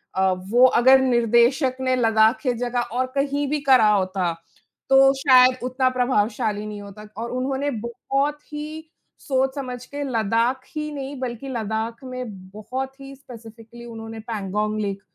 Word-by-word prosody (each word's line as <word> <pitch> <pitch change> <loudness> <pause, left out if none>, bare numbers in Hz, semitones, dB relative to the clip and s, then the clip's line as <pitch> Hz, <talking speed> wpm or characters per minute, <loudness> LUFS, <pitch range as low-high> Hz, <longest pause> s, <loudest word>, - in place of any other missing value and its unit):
अ, 190 0 +2 0.2
वो 245 +3 +6
अगर 260 +1 +6
निर्देशक 250 +2 +2
ने 255 0 +1
लद्दाख 225 -1 +3
के 255 -4 0
जगह 245 0 -2
और 255 +2 0
कहीं 285 +1 0
भी 300 0 0
करा 260 -6 +5
होता, 185 -3 0 0.6
तो 270 0 +6
शायद 255 -2 +5
उतना 255 +1 +1
प्रभावशाली 215 -4 0
नहीं 210 -1 -7
होता। 205 +1 -11
और 235 - -4
उन्होंने 265 +3 -2
बहुत 270 +6 -2
ही 310 +1 -7 0.4
सोच-समझ 265 -2 -2
के 285 0 -6
लद्दाख 230 +1 0
ही 300 0 -3
नहीं, 275 -1 -6
बल्कि 255 +1 -5
लद्दाख 225 0 -3
में 255 -1 -5 0.3
बहुत 260 +6 -6
ही 275 0 -10
स्पेसिफिक्ली 235 -2 -13
उन्होंने 225 -1 -8
पैंगोंग 215 -1 -3
लेक 200 -1 -3
250 Hz, 145 wpm, -23 LUFS, 220-270 Hz, 0.6 s, वो